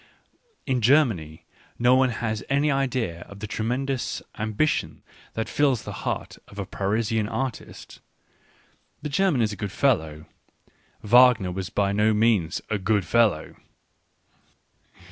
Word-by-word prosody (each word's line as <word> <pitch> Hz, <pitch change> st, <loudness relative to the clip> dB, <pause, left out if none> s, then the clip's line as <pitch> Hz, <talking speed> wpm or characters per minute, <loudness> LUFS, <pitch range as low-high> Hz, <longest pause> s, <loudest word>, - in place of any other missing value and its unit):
In 130 Hz, -3 st, 0 dB
Germany 110 Hz, -, +2 dB, 0.3 s
no 120 Hz, +1 st, +4 dB
one 130 Hz, 0 st, +4 dB
has 110 Hz, -2 st, -3 dB
any 140 Hz, +2 st, +2 dB
idea 125 Hz, -11 st, -1 dB
of 100 Hz, -, -11 dB
the 105 Hz, -, -5 dB
tremendous 125 Hz, +5 st, -2 dB
am 110 Hz, 0 st, -4 dB
bition 155 Hz, +7 st, 0 dB, 0.3 s
that 110 Hz, -, -2 dB
fills 140 Hz, -5 st, +1 dB
the -, -, -7 dB
heart -, -, -4 dB
of 100 Hz, -, -15 dB
a 100 Hz, -, -3 dB
Parisian 105 Hz, +3 st, -1 dB
artist. 130 Hz, -2 st, -5 dB, 1.0 s
The 150 Hz, -, -3 dB
German 155 Hz, -5 st, +2 dB
is 105 Hz, -1 st, -1 dB
a -, -, -6 dB
good 100 Hz, 0 st, -5 dB
fellow. 80 Hz, -, 0 dB, 0.8 s
Wagner 120 Hz, -4 st, +5 dB
was 95 Hz, 0 st, -4 dB
by 100 Hz, -1 st, 0 dB
no 105 Hz, +2 st, +2 dB
means 105 Hz, -7 st, +1 dB
a 105 Hz, -2 st, -2 dB
good 100 Hz, -1 st, +1 dB
fellow. 105 Hz, -5 st, +1 dB
110 Hz, 135 wpm, -25 LUFS, 100-130 Hz, 1.0 s, Wagner